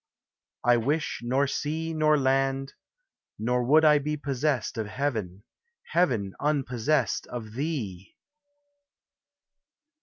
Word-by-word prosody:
I 120 Hz, 0 st, +5 dB
wish 145 Hz, +7 st, -1 dB
nor 130 Hz, +4 st, +1 dB
sea 160 Hz, +4 st, -2 dB
nor 155 Hz, -1 st, +3 dB
land; 135 Hz, 0 st, +1 dB, 0.6 s
nor 125 Hz, +3 st, 0 dB
would 155 Hz, +6 st, +5 dB
I 150 Hz, -1 st, +6 dB
be 150 Hz, +1 st, -2 dB
Possessed 140 Hz, -1 st, -1 dB
of 110 Hz, -, -2 dB
heaven, 105 Hz, -7 st, -3 dB, 0.5 s
heaven 120 Hz, -, +1 dB
unpossessed 140 Hz, -2 st, 0 dB
of 110 Hz, -3 st, -7 dB
thee 115 Hz, -, -4 dB
135 Hz, 100 wpm, -27 LUFS, 120-150 Hz, 0.6 s, I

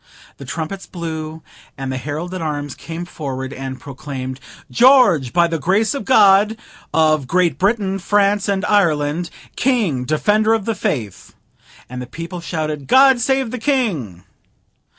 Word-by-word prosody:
The 140 Hz, -, -10 dB
trumpets 165 Hz, +8 st, -5 dB
blew, 160 Hz, -2 st, -6 dB, 0.3 s
and 135 Hz, -1 st, -4 dB
the 130 Hz, -, -3 dB
herald 150 Hz, +7 st, -5 dB
at 185 Hz, -, -4 dB
arms 145 Hz, -3 st, -3 dB
came 165 Hz, +1 st, -7 dB
forward 135 Hz, -6 st, -6 dB
and 130 Hz, -1 st, -6 dB
proclaimed 130 Hz, -2 st, -7 dB, 0.3 s
GEORGE, 235 Hz, -, +5 dB
by 175 Hz, -1 st, +4 dB
the 165 Hz, -1 st, -2 dB
Grace 195 Hz, -, +1 dB
of 280 Hz, -, -5 dB
God, 210 Hz, -3 st, +5 dB, 0.3 s
of 155 Hz, -4 st, +2 dB
Great 180 Hz, +1 st, +1 dB
Britain, 195 Hz, -1 st, +1 dB
France, 205 Hz, +1 st, +1 dB
and 200 Hz, 0 st, 0 dB
Ireland, 165 Hz, -5 st, +1 dB, 0.3 s
King, 215 Hz, -, +1 dB
Defender 210 Hz, -, +2 dB
of 215 Hz, -3 st, -3 dB
the 225 Hz, -, 0 dB
Faith. 110 Hz, -, -4 dB, 0.5 s
And 125 Hz, 0 st, -7 dB
the 125 Hz, -, -7 dB
people 170 Hz, +5 st, -7 dB
shouted 155 Hz, -4 st, -4 dB
God 265 Hz, -, +6 dB
save 265 Hz, -1 st, 0 dB
the 250 Hz, -, -4 dB
King! 190 Hz, -, -1 dB
170 Hz, 150 wpm, -19 LUFS, 145-205 Hz, 0.5 s, God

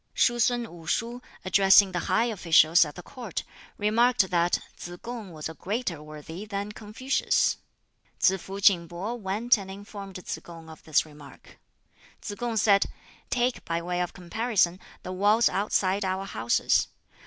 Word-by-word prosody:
Shuh 240 Hz, -1 st, +3 dB
sun 240 Hz, +1 st, +2 dB
Wu 170 Hz, -7 st, -11 dB
shuh, 235 Hz, +7 st, -1 dB, 0.3 s
addressing 195 Hz, +1 st, +6 dB
the 175 Hz, -, -1 dB
high 230 Hz, -, +3 dB
officials 170 Hz, -6 st, +5 dB
at 150 Hz, -, -9 dB
the 180 Hz, -, -9 dB
Court, 235 Hz, -9 st, -6 dB, 0.3 s
remarked 220 Hz, -1 st, +3 dB
that 175 Hz, 0 st, +2 dB, 0.2 s
Tsz 175 Hz, 0 st, -8 dB
kung 235 Hz, -5 st, -7 dB
was 155 Hz, -2 st, -6 dB
a 160 Hz, -, -7 dB
greater 190 Hz, -3 st, -3 dB
worthy 155 Hz, +4 st, -9 dB
than 205 Hz, -1 st, -4 dB
Confucius. 220 Hz, +6 st, 0 dB, 0.6 s
Tsz 190 Hz, -1 st, +3 dB
fuh 195 Hz, +1 st, -7 dB
King 190 Hz, -4 st, +4 dB
pih 205 Hz, +8 st, -5 dB
went 210 Hz, +4 st, +2 dB
and 195 Hz, -1 st, -8 dB
informed 200 Hz, 0 st, -9 dB
Tsz 185 Hz, -, -5 dB
kung 165 Hz, -2 st, -11 dB
of 160 Hz, -, -13 dB
this 155 Hz, 0 st, +2 dB
remark. 145 Hz, -3 st, -15 dB, 0.6 s
Tsz -, -, -6 dB
kung 235 Hz, +1 st, -3 dB
said, 200 Hz, -2 st, +4 dB, 0.4 s
"Take 250 Hz, 0 st, 0 dB
by 165 Hz, 0 st, -2 dB
way 175 Hz, +1 st, -2 dB
of 175 Hz, -, -2 dB
comparison 185 Hz, -1 st, 0 dB, 0.2 s
the 185 Hz, -, -6 dB
walls 205 Hz, +5 st, +4 dB
outside 200 Hz, 0 st, 0 dB
our 190 Hz, +1 st, -2 dB
houses. 115 Hz, -, +1 dB
195 Hz, 160 wpm, -27 LUFS, 175-220 Hz, 0.6 s, addressing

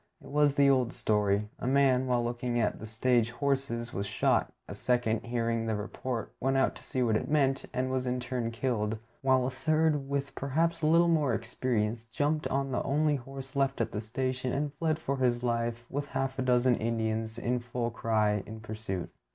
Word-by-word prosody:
It -, -, -13 dB
was 145 Hz, -1 st, +3 dB
the 140 Hz, -1 st, +5 dB
old 130 Hz, -3 st, +3 dB
story. 105 Hz, -1 st, +1 dB
A -, -, -3 dB
man, 130 Hz, -1 st, +3 dB
while 120 Hz, -1 st, +2 dB
looking 120 Hz, 0 st, -1 dB
for 105 Hz, -, +1 dB
the 110 Hz, -, -8 dB
stage 115 Hz, +1 st, +2 dB
horses, 130 Hz, -2 st, -1 dB
was 100 Hz, +1 st, -2 dB
shot; -, -, +1 dB, 0.2 s
a -, -, -6 dB
second, 120 Hz, -3 st, 0 dB
hearing 115 Hz, -1 st, 0 dB
the 110 Hz, -, 0 dB
report, 115 Hz, +3 st, -4 dB
went 135 Hz, +1 st, +1 dB
out 135 Hz, -, +3 dB
to -, -, -14 dB
see 130 Hz, -, -1 dB
what 115 Hz, -3 st, +2 dB
it -, -, -1 dB
meant, 135 Hz, -3 st, +2 dB
and 130 Hz, +1 st, -1 dB
was 130 Hz, -1 st, -1 dB
in 125 Hz, 0 st, 0 dB
turn 125 Hz, -1 st, -2 dB
killed; 115 Hz, -2 st, -1 dB, 0.2 s
while 130 Hz, -1 st, +3 dB
a 130 Hz, -, -1 dB
third, 150 Hz, +1 st, +1 dB
with 140 Hz, -1 st, -2 dB
perhaps 165 Hz, +5 st, 0 dB
a 155 Hz, -, +2 dB
little 165 Hz, +2 st, +5 dB
more 150 Hz, -8 st, +2 dB
experience, 115 Hz, -1 st, -1 dB
jumped 145 Hz, +6 st, 0 dB
on 135 Hz, 0 st, -1 dB
the 130 Hz, -, 0 dB
only 150 Hz, +1 st, +2 dB
horse 135 Hz, +1 st, -9 dB
left 135 Hz, -1 st, +1 dB
at 115 Hz, -, 0 dB
the 105 Hz, -, -3 dB
station 130 Hz, +3 st, -2 dB
and 145 Hz, +2 st, -1 dB
fled 155 Hz, +1 st, 0 dB
for 140 Hz, -4 st, -2 dB
his 125 Hz, -2 st, +1 dB
life, 120 Hz, 0 st, -1 dB
with 145 Hz, +2 st, -3 dB
half 135 Hz, -1 st, -2 dB
a -, -, +2 dB
dozen 125 Hz, 0 st, +3 dB
Indians 110 Hz, 0 st, -1 dB
in 120 Hz, +1 st, 0 dB
full 120 Hz, 0 st, -3 dB
cry 110 Hz, -2 st, +1 dB
in 110 Hz, 0 st, -7 dB
pursuit. 110 Hz, -5 st, -5 dB
125 Hz, 200 wpm, -30 LUFS, 115-135 Hz, 0.2 s, the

